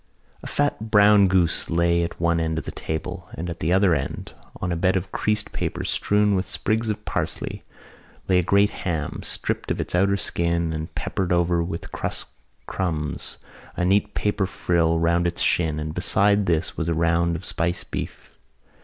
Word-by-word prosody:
A -, -, -8 dB
fat 145 Hz, -6 st, -1 dB
brown 105 Hz, -2 st, +6 dB
goose 90 Hz, -3 st, +2 dB
lay 85 Hz, 0 st, +2 dB
at 85 Hz, -, -4 dB
one 85 Hz, 0 st, +2 dB
end 80 Hz, -1 st, -1 dB
of -, -, -3 dB
the -, -, -4 dB
table 85 Hz, +3 st, -5 dB
and 85 Hz, +1 st, -4 dB
at 85 Hz, -, -7 dB
the 80 Hz, -, 0 dB
other 95 Hz, -1 st, +4 dB
end, 70 Hz, -4 st, -3 dB, 0.3 s
on 90 Hz, -, -2 dB
a -, -, 0 dB
bed 95 Hz, +3 st, +2 dB
of 95 Hz, 0 st, -2 dB
creased 105 Hz, 0 st, -1 dB
paper -, -, -3 dB
strewn 105 Hz, 0 st, +2 dB
with 95 Hz, 0 st, -1 dB
sprigs 110 Hz, +1 st, -1 dB
of 105 Hz, -, -3 dB
parsley, -, -, -3 dB, 0.6 s
lay 90 Hz, -1 st, +4 dB
a -, -, +1 dB
great 100 Hz, +4 st, +3 dB
ham, 80 Hz, -6 st, -3 dB
stripped -, -, -3 dB
of -, -, -1 dB
its -, -, -3 dB
outer 100 Hz, +2 st, +3 dB
skin 85 Hz, -2 st, 0 dB
and 80 Hz, 0 st, -5 dB
peppered 95 Hz, -2 st, -2 dB
over 85 Hz, -1 st, +2 dB
with 85 Hz, 0 st, -5 dB
crust -, -, -4 dB, 0.4 s
crumbs, 80 Hz, -5 st, -3 dB, 0.4 s
a 90 Hz, -, +1 dB
neat 100 Hz, +3 st, +2 dB
paper 105 Hz, -2 st, 0 dB
frill 85 Hz, -3 st, +1 dB
round 85 Hz, +1 st, +2 dB
its 85 Hz, -, -2 dB
shin 80 Hz, -3 st, +1 dB
and 75 Hz, 0 st, -4 dB
beside 100 Hz, +3 st, +2 dB
this 80 Hz, -2 st, 0 dB
was 85 Hz, 0 st, -2 dB
a 85 Hz, -, +1 dB
round 85 Hz, +1 st, +2 dB
of 85 Hz, +3 st, -6 dB
spiced 85 Hz, +1 st, -2 dB
beef. -, -, -6 dB
85 Hz, 185 wpm, -24 LUFS, 85-100 Hz, 0.6 s, brown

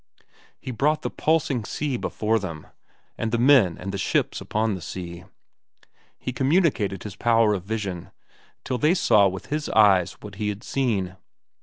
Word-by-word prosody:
He 130 Hz, -, -6 dB
brought 150 Hz, +6 st, +1 dB
the -, -, -2 dB
pulsing 145 Hz, -7 st, 0 dB
sea 145 Hz, +5 st, -3 dB
before 110 Hz, -1 st, 0 dB
them, 85 Hz, -6 st, -7 dB, 0.5 s
and 115 Hz, -1 st, -1 dB
the 120 Hz, -, +1 dB
men 120 Hz, -, +5 dB
and 95 Hz, +2 st, -5 dB
the 100 Hz, -, -4 dB
ships -, -, 0 dB
upon 110 Hz, 0 st, -1 dB
the 95 Hz, -, -5 dB
sea. 85 Hz, +1 st, -7 dB, 0.9 s
He 125 Hz, -, -5 dB
communicated 130 Hz, -, +1 dB
his 105 Hz, -3 st, -7 dB
power 115 Hz, -2 st, +3 dB
of 95 Hz, -3 st, -4 dB
vision, 100 Hz, -5 st, -4 dB, 0.6 s
till 125 Hz, -, -2 dB
they 155 Hz, +4 st, +3 dB
saw 105 Hz, -, +4 dB
with 95 Hz, +7 st, -6 dB
his 150 Hz, 0 st, -2 dB
eyes 100 Hz, -5 st, +4 dB
what 105 Hz, -1 st, -11 dB
he 105 Hz, -, 0 dB
had 105 Hz, +2 st, -5 dB
seen. 100 Hz, -10 st, -1 dB
110 Hz, 165 wpm, -24 LUFS, 95-130 Hz, 0.9 s, men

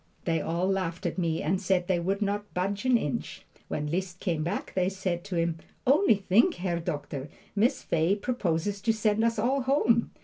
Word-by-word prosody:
They 165 Hz, -2 st, +1 dB
all 170 Hz, +3 st, 0 dB
laughed 185 Hz, -3 st, -1 dB
at -, -, -1 dB
me 165 Hz, -2 st, 0 dB
and 185 Hz, +5 st, 0 dB
said 185 Hz, -2 st, +1 dB
they 180 Hz, -1 st, +1 dB
would 195 Hz, +4 st, 0 dB
not 205 Hz, +1 st, -3 dB
budge 195 Hz, +5 st, -1 dB
an 255 Hz, -2 st, +5 dB
inch. 150 Hz, -11 st, -4 dB, 0.2 s
When 150 Hz, -, -2 dB
Liszt 180 Hz, +3 st, -3 dB
came 165 Hz, -5 st, -1 dB
back 180 Hz, +6 st, -3 dB
they 185 Hz, 0 st, +2 dB
said 190 Hz, -3 st, -3 dB
to 195 Hz, -3 st, -4 dB
him, 165 Hz, -1 st, 0 dB, 0.3 s
"Only 280 Hz, -, +5 dB
think, 205 Hz, -, +3 dB
Herr 175 Hz, -2 st, -2 dB
Doctor, 145 Hz, -4 st, -4 dB, 0.3 s
Miss 235 Hz, +7 st, +2 dB
Fay 165 Hz, +4 st, +2 dB
proposes 200 Hz, -4 st, -1 dB
to 225 Hz, +2 st, +2 dB
send 220 Hz, 0 st, +1 dB
us 230 Hz, 0 st, +2 dB
all 260 Hz, +6 st, +1 dB
home." 245 Hz, -3 st, +2 dB
190 Hz, 195 wpm, -28 LUFS, 170-210 Hz, 0.3 s, an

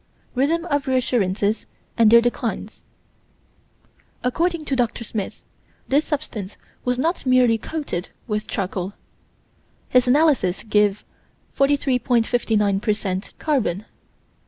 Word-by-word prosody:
Rhythm 315 Hz, +6 st, +1 dB
of 285 Hz, -4 st, -1 dB
reassurances 220 Hz, -5 st, +1 dB, 0.3 s
and 225 Hz, -2 st, +5 dB
their 235 Hz, +1 st, +8 dB
declines: 240 Hz, 0 st, -3 dB, 1.4 s
According 330 Hz, +5 st, 0 dB
to 275 Hz, -, -1 dB
Dr. 240 Hz, -2 st, 0 dB
Smith, 210 Hz, -3 st, -5 dB, 0.5 s
this 285 Hz, +3 st, +3 dB
substance 220 Hz, -10 st, -4 dB, 0.3 s
was 250 Hz, 0 st, 0 dB
not 330 Hz, +7 st, 0 dB
merely 250 Hz, -3 st, +4 dB
coated 285 Hz, -, -4 dB, 0.2 s
with 210 Hz, -1 st, -2 dB
charcoal; 190 Hz, -1 st, -3 dB, 1.0 s
his 250 Hz, 0 st, +4 dB
analysis 265 Hz, -, +3 dB
gives 210 Hz, -2 st, +2 dB, 0.5 s
43.59 240 Hz, -7 st, +2 dB
per 215 Hz, -, +2 dB
cent 190 Hz, -2 st, -4 dB
carbon. 225 Hz, -, 0 dB
240 Hz, 105 wpm, -22 LUFS, 210-275 Hz, 1.4 s, their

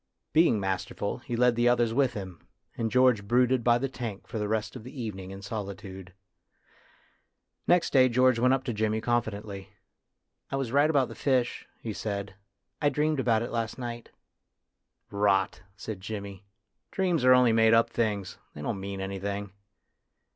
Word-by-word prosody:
Being 160 Hz, -9 st, +4 dB
masterful, 95 Hz, +3 st, -3 dB
he 120 Hz, -1 st, -5 dB
led 125 Hz, 0 st, +3 dB
the 120 Hz, +1 st, +3 dB
others 120 Hz, -2 st, +2 dB
with 130 Hz, -1 st, +2 dB
him, 95 Hz, -4 st, -7 dB, 0.3 s
and 115 Hz, -1 st, -1 dB
George 125 Hz, -3 st, +3 dB
brooded 125 Hz, +1 st, +3 dB
by 120 Hz, 0 st, +4 dB
the 135 Hz, +3 st, -1 dB
tank 115 Hz, -6 st, -6 dB
for 115 Hz, -, -5 dB
the 105 Hz, -, -1 dB
rest 110 Hz, +2 st, -2 dB
of 125 Hz, -, -8 dB
the 130 Hz, +3 st, -10 dB
evening 95 Hz, -5 st, -5 dB
in 95 Hz, +1 st, -9 dB
solitude. 100 Hz, -3 st, -7 dB, 1.6 s
Next 175 Hz, -1 st, +3 dB
day 130 Hz, -2 st, +6 dB
George 130 Hz, 0 st, +3 dB
went 125 Hz, +2 st, +4 dB
up 135 Hz, -, -4 dB
to 120 Hz, -, -3 dB
Jimmy 110 Hz, 0 st, 0 dB
con 120 Hz, +1 st, +2 dB
fidently. 100 Hz, -3 st, -7 dB, 0.4 s
" -, -, -55 dB
I -, -, -1 dB
was 135 Hz, -4 st, -2 dB
right 145 Hz, +3 st, +4 dB
about 140 Hz, -5 st, +3 dB
the -, -, -9 dB
fish," 130 Hz, -3 st, 0 dB
he 110 Hz, -, -5 dB
said. 100 Hz, -1 st, -4 dB, 0.5 s
"I 145 Hz, -, +4 dB
dreamed 150 Hz, +1 st, 0 dB
about 115 Hz, -3 st, +2 dB
it -, -, -5 dB
last 115 Hz, -1 st, -2 dB
night." 120 Hz, -2 st, -6 dB, 0.6 s
" -, -, -48 dB, 0.2 s
Rot! 95 Hz, -1 st, +1 dB
" 95 Hz, -, -35 dB
said 100 Hz, -1 st, -6 dB
Jimmy; 100 Hz, -1 st, -7 dB, 0.2 s
" -, -, -53 dB
dreams 180 Hz, -7 st, 0 dB
are 130 Hz, 0 st, +7 dB
only 125 Hz, -2 st, +5 dB
made 110 Hz, 0 st, +5 dB
up 115 Hz, -, +3 dB
things; 105 Hz, -5 st, -2 dB, 0.2 s
they 75 Hz, -, -7 dB
don't 100 Hz, +3 st, -2 dB
mean 100 Hz, 0 st, -5 dB
anything." 100 Hz, +1 st, -4 dB
115 Hz, 185 wpm, -28 LUFS, 100-125 Hz, 1.6 s, are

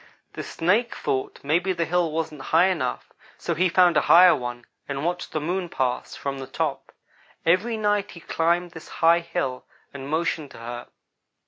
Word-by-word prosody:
The -, -, -5 dB
Snake 210 Hz, +8 st, 0 dB
thought 130 Hz, -1 st, -2 dB
maybe 175 Hz, +6 st, +1 dB
the 170 Hz, -2 st, -1 dB
hill 170 Hz, -1 st, +1 dB
wasn't 155 Hz, -2 st, -3 dB
high 170 Hz, +4 st, +5 dB
enough, 160 Hz, -, -3 dB, 0.2 s
so 170 Hz, -, -2 dB
he 180 Hz, +3 st, +2 dB
found 175 Hz, -1 st, +4 dB
a -, -, +5 dB
higher 180 Hz, +1 st, +8 dB
one, 120 Hz, -1 st, -6 dB, 0.2 s
and 140 Hz, +2 st, -3 dB
watched 175 Hz, +1 st, -2 dB
the 155 Hz, -, -1 dB
Moon 175 Hz, +3 st, -2 dB
pass, 130 Hz, -5 st, -2 dB
from 140 Hz, -1 st, -4 dB
the 135 Hz, -, -7 dB
top. 145 Hz, +1 st, -3 dB, 0.5 s
Every 205 Hz, +7 st, +2 dB
night 205 Hz, -1 st, 0 dB
he 170 Hz, -, -11 dB
climbed 170 Hz, +2 st, 0 dB
this 160 Hz, -, -11 dB, 0.2 s
high 170 Hz, +1 st, +6 dB
hill 130 Hz, -6 st, -3 dB, 0.3 s
and 140 Hz, 0 st, -7 dB
motioned 160 Hz, -1 st, -1 dB
to -, -, -12 dB
her. 120 Hz, +1 st, -7 dB
165 Hz, 180 wpm, -24 LUFS, 140-180 Hz, 0.5 s, higher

